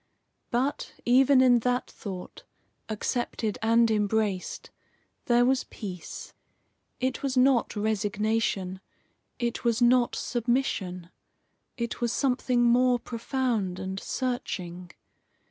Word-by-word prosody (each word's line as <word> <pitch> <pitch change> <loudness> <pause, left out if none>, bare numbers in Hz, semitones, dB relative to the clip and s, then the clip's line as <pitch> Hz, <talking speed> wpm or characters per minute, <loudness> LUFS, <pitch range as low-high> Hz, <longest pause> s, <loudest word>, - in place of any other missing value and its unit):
But, 260 +4 -1
even 260 +2 +5
in 245 -2 +6
that 250 +2 0
thought, 185 -3 -8 0.5
accepted 220 0 -2
and 230 0 +4
embraced, 210 -2 -1 0.5
there 240 0 +4
was 260 +1 +2
peace. 185 -6 -8 0.7
It 260 +1 -1
was 270 -2 -1
not 255 -2 +3
resignation. 210 -2 -1 0.6
It 240 -1 -2
was 235 -2 +2
not 245 0 +4
submission. 220 -8 -1 0.7
It 235 -1 -4
was 240 -1 +1
something 250 -2 +1
more 245 +1 +4
profound 230 -5 -2
and 190 +1 -4
searching. 180 -10 -4
235 Hz, 100 wpm, -27 LUFS, 205-250 Hz, 0.7 s, in